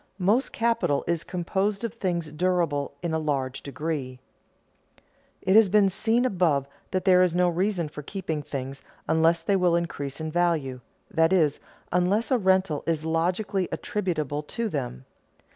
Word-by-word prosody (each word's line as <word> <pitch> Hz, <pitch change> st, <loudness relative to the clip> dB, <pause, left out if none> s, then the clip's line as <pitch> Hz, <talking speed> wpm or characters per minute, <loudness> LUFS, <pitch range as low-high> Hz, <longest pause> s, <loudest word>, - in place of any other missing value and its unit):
Most 205 Hz, +8 st, +2 dB
capital 230 Hz, -11 st, +1 dB
is 170 Hz, -1 st, -1 dB
composed 195 Hz, +4 st, -2 dB
of 230 Hz, -, -3 dB
things 175 Hz, -8 st, -2 dB
durable 160 Hz, -4 st, 0 dB
in 170 Hz, -2 st, -1 dB
a 160 Hz, -, +1 dB
large 135 Hz, -4 st, -2 dB
degree. 140 Hz, -2 st, -4 dB, 1.3 s
It 190 Hz, +1 st, +3 dB
has 220 Hz, -3 st, +7 dB
been 200 Hz, 0 st, +4 dB
seen 225 Hz, +6 st, +1 dB
above 170 Hz, -, +1 dB, 0.2 s
that 185 Hz, -, -2 dB
there 185 Hz, -1 st, +6 dB
is 180 Hz, -2 st, +2 dB
no 180 Hz, 0 st, +3 dB
reason 175 Hz, 0 st, 0 dB
for 150 Hz, 0 st, -8 dB
keeping 160 Hz, -2 st, -4 dB
things 135 Hz, -1 st, -6 dB, 0.3 s
unless 160 Hz, +1 st, +3 dB
they 200 Hz, -, +2 dB
will 180 Hz, -2 st, +3 dB
increase 145 Hz, -5 st, -3 dB
in 160 Hz, 0 st, -4 dB
value, 155 Hz, -7 st, 0 dB, 0.3 s
that 165 Hz, +1 st, +3 dB
is, 160 Hz, -6 st, +3 dB, 0.3 s
unless 185 Hz, +8 st, +1 dB
a 255 Hz, -, +4 dB
rental 190 Hz, -6 st, +2 dB
is 160 Hz, -2 st, 0 dB
logically 180 Hz, +4 st, 0 dB
attributable 155 Hz, -8 st, -2 dB
to 225 Hz, +9 st, -3 dB
them. 125 Hz, -, -4 dB
170 Hz, 155 wpm, -26 LUFS, 150-190 Hz, 1.3 s, has